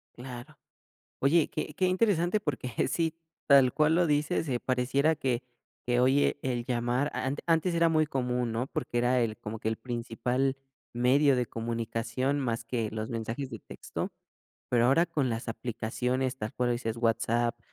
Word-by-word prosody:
Claro. 120 Hz, -1 st, -9 dB, 0.6 s
Oye, 150 Hz, +3 st, +3 dB
qué 155 Hz, 0 st, -4 dB
qué 185 Hz, -, +2 dB
interesante, 185 Hz, 0 st, +2 dB
porque 135 Hz, -7 st, -3 dB, 0.2 s
sí, 165 Hz, +1 st, 0 dB, 0.3 s
tal 135 Hz, -3 st, +7 dB
cual 155 Hz, +1 st, +3 dB
lo 175 Hz, 0 st, +4 dB
dices, 150 Hz, 0 st, +1 dB
eh, 125 Hz, -2 st, 0 dB
pareciera 130 Hz, +5 st, +1 dB
que, 125 Hz, -5 st, -1 dB, 0.4 s
que 120 Hz, 0 st, +3 dB
oye, 135 Hz, +3 st, +3 dB
el 120 Hz, -2 st, -2 dB
llamar, 125 Hz, +3 st, 0 dB
a -, -, -3 dB
ant 135 Hz, +2 st, -2 dB
antes 165 Hz, +2 st, +2 dB
era 170 Hz, 0 st, +4 dB
muy 155 Hz, -1 st, +3 dB
común, 125 Hz, -4 st, -1 dB
¿no? 115 Hz, +3 st, -2 dB
Porque 120 Hz, -, -3 dB
era 125 Hz, +1 st, +3 dB
el 110 Hz, -2 st, -1 dB
cómo 110 Hz, +1 st, -6 dB
que 110 Hz, -, -1 dB
el 110 Hz, -, -2 dB
principal 125 Hz, +2 st, -1 dB, 0.4 s
medio 130 Hz, +3 st, +4 dB
de 125 Hz, -, +1 dB
comunicación, 115 Hz, +4 st, -2 dB
más 115 Hz, -3 st, -2 dB
que 115 Hz, -3 st, -2 dB
los 110 Hz, 0 st, -4 dB
mensajes 115 Hz, +4 st, -4 dB
de 115 Hz, -, -7 dB
texto, -, -, -6 dB, 0.6 s
pero 120 Hz, -1 st, +3 dB
ahora 140 Hz, +7 st, +5 dB
con 150 Hz, -7 st, 0 dB
las 115 Hz, +1 st, -4 dB
aplicaciones, 125 Hz, +3 st, -2 dB
tal 110 Hz, -4 st, -5 dB
cual 125 Hz, 0 st, 0 dB
lo -, -, +2 dB
dices, 115 Hz, -2 st, -3 dB
WhatsApp, 115 Hz, 0 st, +1 dB
125 Hz, 175 wpm, -29 LUFS, 120-145 Hz, 0.6 s, tal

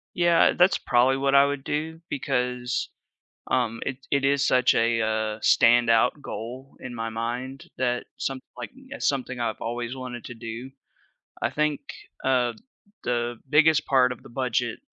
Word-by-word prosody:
Yeah, 175 Hz, -1 st, +4 dB
that's 180 Hz, +2 st, +5 dB
probably 130 Hz, +2 st, +3 dB
what 135 Hz, 0 st, +1 dB
I 140 Hz, 0 st, +7 dB
would 140 Hz, -1 st, -3 dB
do 160 Hz, +3 st, -3 dB
because, 125 Hz, -2 st, -1 dB, 0.6 s
um, 115 Hz, -3 st, 0 dB
it 135 Hz, -, -3 dB
it 140 Hz, -1 st, +2 dB
is 140 Hz, 0 st, +2 dB
such 125 Hz, 0 st, +4 dB
a, 115 Hz, 0 st, +2 dB
uh, 110 Hz, 0 st, -1 dB
standout 120 Hz, +5 st, +4 dB
goal 130 Hz, +4 st, -7 dB
in 125 Hz, -, -7 dB
my 115 Hz, -1 st, -3 dB
mind 120 Hz, +4 st, -4 dB
that 125 Hz, -1 st, 0 dB
some 135 Hz, -1 st, -3 dB, 0.2 s
like, -, -, -6 dB, 0.2 s
it's 285 Hz, +1 st, -2 dB
something 130 Hz, -2 st, -1 dB
I've 115 Hz, -2 st, -2 dB
always 120 Hz, +2 st, -3 dB
wanted 125 Hz, -2 st, -7 dB
to 125 Hz, -, -8 dB
do. 115 Hz, +2 st, -7 dB, 0.7 s
I -, -, +1 dB
think, 150 Hz, -1 st, 0 dB, 0.4 s
uh, 125 Hz, -3 st, +2 dB, 0.5 s
the 120 Hz, -1 st, -1 dB
biggest 155 Hz, 0 st, +4 dB
part 130 Hz, -2 st, +4 dB
of -, -, -17 dB
the -, -, -13 dB
budget 125 Hz, -1 st, -1 dB
125 Hz, 155 wpm, -25 LUFS, 120-135 Hz, 0.7 s, I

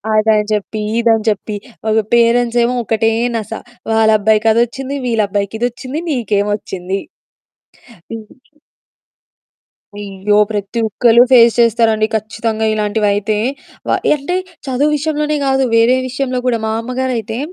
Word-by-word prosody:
అదని 215 Hz, -1 st, +3 dB
చెప్పి, 210 Hz, +1 st, -3 dB, 0.2 s
ఇదని 225 Hz, -2 st, +2 dB
చెప్పి 210 Hz, 0 st, -3 dB, 0.4 s
ఒక 220 Hz, -, +3 dB
పేరెంట్సేమో 235 Hz, +1 st, +3 dB
ఒకటే 225 Hz, 0 st, +1 dB, 0.3 s
నస. 220 Hz, -1 st, -6 dB, 0.4 s
వాళ్ళబ్బాయికి 220 Hz, 0 st, +3 dB
అదొచ్చింది, 255 Hz, +4 st, -1 dB
వీళ్ళబ్బాయికిదొచ్చింది 225 Hz, +6 st, -2 dB
నీకేమొచ్చింది? 205 Hz, -, -2 dB, 3.0 s
అయ్యో! 200 Hz, 0 st, -1 dB
ప్రతి 205 Hz, +2 st, -3 dB
ఒక్కళ్ళు 235 Hz, +2 st, +4 dB
ఫేస్ 235 Hz, -2 st, +6 dB
చేస్తారండి 225 Hz, -2 st, +3 dB
ఖచ్చితంగా 220 Hz, +1 st, -2 dB
ఇలాంటివైతే. 210 Hz, 0 st, 0 dB, 0.5 s
వ -, -, 0 dB, 0.3 s
అంటే 300 Hz, +6 st, -3 dB, 0.3 s
చదువు 270 Hz, +3 st, +1 dB
విషయంలోనే 300 Hz, 0 st, -1 dB
గాదు, 270 Hz, 0 st, +2 dB
వేరే 230 Hz, +3 st, +4 dB
విషయంలో 255 Hz, 0 st, -2 dB
గూడా. 240 Hz, -2 st, +1 dB
మా -, -, -1 dB
అమ్మగారైతే 245 Hz, -2 st, -3 dB
225 Hz, 100 wpm, -16 LUFS, 210-245 Hz, 3.0 s, ఫేస్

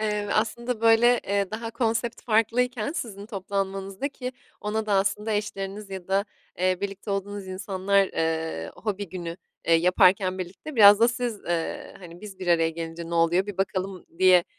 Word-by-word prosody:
Eee, 210 Hz, -1 st, -1 dB
aslında, 230 Hz, +2 st, -1 dB
böyle, 230 Hz, +2 st, +5 dB
eee, 200 Hz, -1 st, 0 dB
daha 225 Hz, +1 st, -4 dB
konsept 230 Hz, 0 st, -1 dB
farklıyken 235 Hz, +3 st, +1 dB
sizin 205 Hz, -, -5 dB
toplanmanızda, 195 Hz, +2 st, -3 dB
ki 255 Hz, -2 st, -6 dB, 0.3 s
ona 215 Hz, +1 st, -2 dB
da 205 Hz, -, 0 dB
aslında 200 Hz, +3 st, +1 dB
eşleriniz 205 Hz, -1 st, -4 dB
ya 190 Hz, -2 st, -7 dB
da, 195 Hz, +1 st, +2 dB, 0.3 s
eee, 185 Hz, 0 st, +2 dB
birlikte 200 Hz, +1 st, -5 dB
olduğunuz 200 Hz, 0 st, -3 dB
insanlar, 195 Hz, +1 st, +1 dB
eee, 160 Hz, -, -2 dB
hobi 205 Hz, -2 st, -3 dB
günü, 170 Hz, -1 st, -6 dB, 0.3 s
eee, 165 Hz, -, +5 dB
yaparken 185 Hz, +2 st, +4 dB
birlikte 185 Hz, -, -7 dB
biraz 205 Hz, -1 st, +9 dB
da 230 Hz, -, +6 dB
siz, 240 Hz, -3 st, -3 dB
eee, 170 Hz, -1 st, -3 dB
“Hani, 175 Hz, -2 st, -12 dB
biz 205 Hz, -3 st, -10 dB
bir 185 Hz, -, -6 dB
araya 165 Hz, -2 st, +3 dB
gelince 165 Hz, 0 st, -6 dB
ne -, -, -2 dB
oluyor? 170 Hz, +3 st, +3 dB
Bir 205 Hz, -3 st, -6 dB
bakalım.“ 190 Hz, -1 st, -2 dB
diye, 185 Hz, -2 st, +6 dB
195 Hz, 165 wpm, -26 LUFS, 185-220 Hz, 0.3 s, biraz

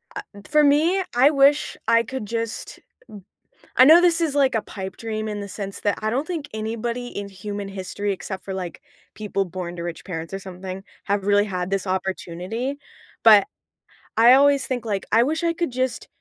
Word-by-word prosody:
I -, -, -3 dB, 0.3 s
for 300 Hz, 0 st, +4 dB
me, 320 Hz, +7 st, +3 dB
I 260 Hz, +4 st, +6 dB
wish 280 Hz, +1 st, +3 dB
I 230 Hz, 0 st, +4 dB
could 260 Hz, -1 st, -5 dB
just 230 Hz, +1 st, -4 dB
n -, -, -35 dB, 0.9 s
I 255 Hz, -, +9 dB
know 320 Hz, +5 st, +8 dB
this 345 Hz, -1 st, +3 dB
is 310 Hz, -4 st, 0 dB
like 270 Hz, -3 st, +3 dB
a 220 Hz, -, +1 dB
pipe 190 Hz, -2 st, -8 dB
dream 220 Hz, -1 st, -4 dB
in 210 Hz, -1 st, -4 dB
the 200 Hz, -, -6 dB
sense 195 Hz, 0 st, -6 dB
that 205 Hz, -, 0 dB
I 215 Hz, -, 0 dB
don't 265 Hz, +7 st, -1 dB
think 325 Hz, -5 st, -4 dB
anybody 230 Hz, +3 st, -3 dB
in 200 Hz, -4 st, -6 dB
human 200 Hz, +1 st, -6 dB
history 195 Hz, +1 st, -4 dB
except 190 Hz, 0 st, -7 dB
for, 195 Hz, -, -5 dB
like, 180 Hz, -3 st, -6 dB, 0.3 s
people 205 Hz, -2 st, -2 dB
born 175 Hz, -1 st, -6 dB
to 170 Hz, -, -5 dB
rich 170 Hz, -1 st, -6 dB
parents 165 Hz, -2 st, -6 dB
or 195 Hz, -, -3 dB
something 190 Hz, 0 st, -8 dB, 0.2 s
have 200 Hz, -1 st, -1 dB
really 205 Hz, 0 st, +4 dB
had 180 Hz, -3 st, -3 dB
this 195 Hz, 0 st, -1 dB
opportunity, 190 Hz, +7 st, -3 dB, 0.5 s
but 210 Hz, -3 st, +7 dB, 0.7 s
I 235 Hz, +2 st, +8 dB
always 280 Hz, 0 st, +5 dB
think, 245 Hz, -3 st, -3 dB
like, 200 Hz, -3 st, -2 dB
I 225 Hz, +2 st, +5 dB
wish 315 Hz, +6 st, -1 dB
I 335 Hz, -, +2 dB
could 335 Hz, -4 st, -2 dB
just 255 Hz, 0 st, -2 dB
215 Hz, 195 wpm, -23 LUFS, 195-265 Hz, 0.9 s, I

